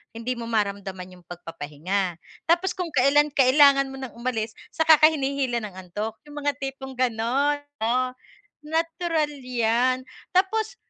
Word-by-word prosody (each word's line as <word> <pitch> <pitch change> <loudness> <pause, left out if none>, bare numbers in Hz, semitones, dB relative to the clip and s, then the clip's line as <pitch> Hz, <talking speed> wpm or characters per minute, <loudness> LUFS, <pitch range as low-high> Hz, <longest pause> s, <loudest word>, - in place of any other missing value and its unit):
hindi 230 +2 -3
mo 235 - -6
maramdaman 200 -4 -2
yung 175 - -22
pagpapahinga. 175 +2 -4 0.3
Tapos 345 +3 +3
kung 360 -2 -3
kailan 290 +2 +4
kailangan 275 +1 +5
mo 270 - -8
nang 260 -2 -6
umalis, 235 -2 -2 0.2
tsaka 320 -1 +6
ka 310 - +8
hinihila 270 -4 -1
ng 205 -3 -7
antok. 215 +4 -5
Yung 295 0 -7
mga 290 - +2
tipong 270 -1 -6
gano’n, 255 +5 +1 0.2
oo. 245 +3 +1 0.6
Natural 325 0 -1
‘yan. 250 +1 +1 0.3
Tapos 440 +5 +1
255 Hz, 140 wpm, -25 LUFS, 220-295 Hz, 0.6 s, ka